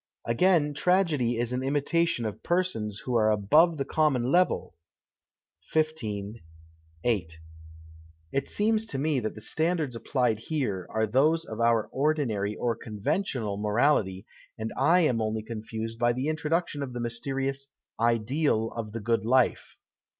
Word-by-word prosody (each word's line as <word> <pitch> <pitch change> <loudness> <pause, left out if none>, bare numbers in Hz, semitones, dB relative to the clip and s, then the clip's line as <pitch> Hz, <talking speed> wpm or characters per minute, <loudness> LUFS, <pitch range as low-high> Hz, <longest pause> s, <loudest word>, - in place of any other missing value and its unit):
Again, 150 +4 +3
tragedy 150 -9 +2
is 120 +1 -1
an 125 - -1
imitation 145 0 0
of 105 - -5
persons 170 - -1
who 125 - -4
are 110 -2 +4
above 150 - +4
the 135 - -2
common 135 -5 +1
level 180 - +2 1.0
(XV. 110 -10 -1 0.7
8). 90 -9 -1 0.9
It 135 0 -1
seems 220 +1 +1
to 140 - -4
me 145 0 +1
that 110 -2 -4
the 110 - -10
standards 160 0 0
aj)plied 120 -2 0
here 110 - -2
are 110 0 0
those 150 +9 +2
of 110 - -7
our 115 -2 +3
ordinary, 130 -8 0
or 120 -2 -1
eon\entional, 110 - -2
morality, 105 -3 +1 0.3
and 110 0 -4
I 180 +2 +4
am 125 -8 +2
only 110 0 -2
confused 110 0 -6
by 120 +1 +3
the 130 +5 -2
introduction 155 0 -1
of 130 -3 -4
the 120 - -4
mysterious 135 +3 -2 0.2
" - - -66
ideal 115 +1 +1
of 110 -2 -6
the 115 - -3
good 115 +2 0
life.'' 125 +2 +1
125 Hz, 145 wpm, -27 LUFS, 110-155 Hz, 1.0 s, are